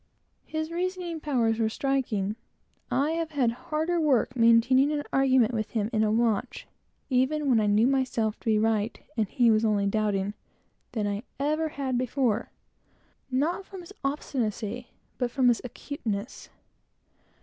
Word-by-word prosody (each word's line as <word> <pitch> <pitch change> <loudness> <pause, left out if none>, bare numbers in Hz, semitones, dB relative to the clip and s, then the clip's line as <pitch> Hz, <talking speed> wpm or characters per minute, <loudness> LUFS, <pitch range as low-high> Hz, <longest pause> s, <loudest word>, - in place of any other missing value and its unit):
His 315 +1 -4
reasoning 355 -1 -3
powers 235 -7 +1
were 220 -1 +2
remarkable. 240 -8 0 0.6
I 285 +3 +1
have 330 0 -2
had 270 -6 +1
harder 315 +7 -1
work 260 -4 +2
maintaining 245 +4 +5
an 295 -1 -1
argument 260 -3 +4
with 215 -1 -2
him 220 -1 -2
in 215 -1 +2
a 210 - +2
watch, 230 +1 0 0.5
even 275 +4 +1
when 245 -4 +4
I 210 - +1
knew 210 +2 +4
myself 255 -5 0
to - - -24
be 220 -1 +4
right, 220 0 0 0.2
and 220 -3 +1
he 235 +3 +3
was 215 0 +3
only 210 -2 +2
doubting, 205 -1 0 0.6
than 215 -3 -1
I 205 0 -2 0.2
ever 305 +3 +1
had 265 -4 -2
before; 250 -3 0 0.8
not 300 +9 0
from 385 -1 -10
his 350 +3 -12
obstinacy, 245 -5 -2 0.3
but 245 -2 0
from 250 0 +3
his 240 - +2
acuteness. 235 -3 -5
245 Hz, 150 wpm, -27 LUFS, 220-285 Hz, 0.8 s, maintaining